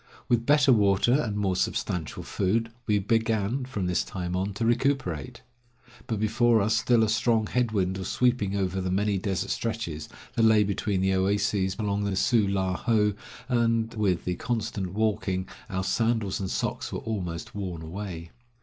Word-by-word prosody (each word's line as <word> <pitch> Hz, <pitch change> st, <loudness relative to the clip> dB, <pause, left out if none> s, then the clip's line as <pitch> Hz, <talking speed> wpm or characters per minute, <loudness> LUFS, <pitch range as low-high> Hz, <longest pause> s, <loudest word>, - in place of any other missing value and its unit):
With 120 Hz, -1 st, +1 dB
better 145 Hz, -2 st, +5 dB
water 100 Hz, +2 st, +3 dB
and 115 Hz, -7 st, +1 dB
more 95 Hz, -3 st, 0 dB
substantial 85 Hz, -2 st, -2 dB
food 115 Hz, +4 st, 0 dB, 0.2 s
we 105 Hz, -, +3 dB
began, 110 Hz, +4 st, 0 dB
from 105 Hz, -8 st, -3 dB
this 90 Hz, -1 st, +1 dB
time 90 Hz, -1 st, -4 dB
on, 95 Hz, +2 st, -1 dB
to 115 Hz, -, -1 dB
recuperate. 120 Hz, -, 0 dB, 0.6 s
But 110 Hz, -3 st, -2 dB
before 110 Hz, +2 st, +3 dB
us 110 Hz, +2 st, +2 dB
still 115 Hz, 0 st, +3 dB
a -, -, +3 dB
strong 110 Hz, 0 st, +2 dB
head 125 Hz, +1 st, 0 dB
wind 95 Hz, -2 st, 0 dB
was 95 Hz, -, -4 dB
sweeping 120 Hz, -6 st, +1 dB
over 95 Hz, -1 st, -1 dB
the 95 Hz, -, -2 dB
many 100 Hz, +1 st, +1 dB
desert 95 Hz, -1 st, -2 dB
stretches 110 Hz, -10 st, -3 dB, 0.2 s
that -, -, 0 dB
lay 110 Hz, -2 st, +5 dB
between 100 Hz, -1 st, -1 dB
the 95 Hz, 0 st, +2 dB
oases 95 Hz, 0 st, +1 dB
along 100 Hz, -1 st, -1 dB
the 100 Hz, -1 st, -1 dB
Su 105 Hz, +2 st, +3 dB
la 95 Hz, -1 st, 0 dB
ho, 105 Hz, -3 st, +2 dB, 0.3 s
and 115 Hz, -2 st, +1 dB
with 100 Hz, -5 st, 0 dB
the 90 Hz, -1 st, -1 dB
constant 110 Hz, -6 st, -3 dB
walking 105 Hz, -3 st, 0 dB, 0.2 s
our 95 Hz, 0 st, -2 dB
sandals 110 Hz, 0 st, 0 dB
and 95 Hz, -2 st, -3 dB
socks -, -, -2 dB
were -, -, -3 dB
almost 90 Hz, -7 st, -4 dB
worn 90 Hz, -5 st, -5 dB
away. 85 Hz, -1 st, -6 dB
105 Hz, 170 wpm, -27 LUFS, 95-115 Hz, 0.6 s, better